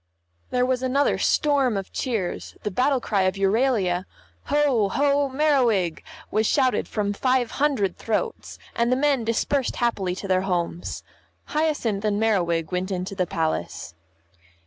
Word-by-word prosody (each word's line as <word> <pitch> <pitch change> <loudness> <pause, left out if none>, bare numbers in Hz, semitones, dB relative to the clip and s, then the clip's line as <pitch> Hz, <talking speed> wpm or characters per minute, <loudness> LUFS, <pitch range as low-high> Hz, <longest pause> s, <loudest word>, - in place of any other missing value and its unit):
There 250 0 +1
was 255 0 0
another 265 +2 +1
storm 275 -7 +2
of 195 - -6
cheers, 220 -9 -3
the 210 - -2
battle 260 +6 +2
cry 205 -4 0
of 185 0 +1
Euralia, 195 -3 +1 0.4
"Ho, 275 -9 +2
ho, 280 +3 +2
Merriwig!" 255 - +2 0.3
was 215 +1 +2
shouted 260 -3 +2
from 205 -2 -1
five 255 +2 +1
hundred 240 -11 +1
throats, 450 - -3 0.2
and 235 +1 +1
the - - +4
men 275 -2 +2
dispersed 235 +4 0
happily 195 -7 0
to 195 - -6
their 185 -1 +2
homes. 175 -2 -3 0.5
Hyacinth 290 -10 0
and 210 -1 +1
Merriwig 175 -7 +1
went 180 +1 -2
into 185 0 -3
the 185 -2 -1
Palace. 160 - -3
225 Hz, 145 wpm, -24 LUFS, 190-265 Hz, 0.5 s, the